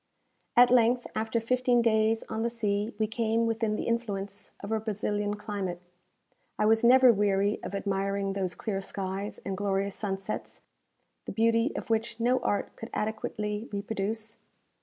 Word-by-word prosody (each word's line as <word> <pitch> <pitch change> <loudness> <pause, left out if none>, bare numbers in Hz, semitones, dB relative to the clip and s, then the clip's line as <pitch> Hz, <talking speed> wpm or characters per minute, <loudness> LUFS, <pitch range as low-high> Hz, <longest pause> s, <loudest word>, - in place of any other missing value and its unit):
At 245 0 +8
length, 245 0 +4
after 220 +1 0
fifteen 245 +1 +2
days 220 0 +3
on 220 0 -3
the 235 - +1
sea, 210 -2 -1
we 215 - +2
came 225 +1 0
within 225 -1 0
the - - -2
influence 205 -4 -3
of 200 - -6
a 220 - +1
Brazilian 210 -1 -2
climate. 205 -4 -4 0.8
I - - +2
was 225 +1 +4
never 255 0 +7
weary 200 0 +1
of - - -5
admiring 195 0 -1
those 185 -3 -2
clear 195 -3 -3
skies 195 +1 -4
and 195 - -2
glorious 200 0 -1
sunsets 195 0 -4 0.6
the - - -5
beauty 230 +4 +2
of - - -4
which 230 +1 0
no 250 +2 +3
art 205 -4 -1
could 225 - -8
adequately 210 0 -3
reproduce. 215 +2 -3
215 Hz, 155 wpm, -29 LUFS, 200-230 Hz, 0.8 s, At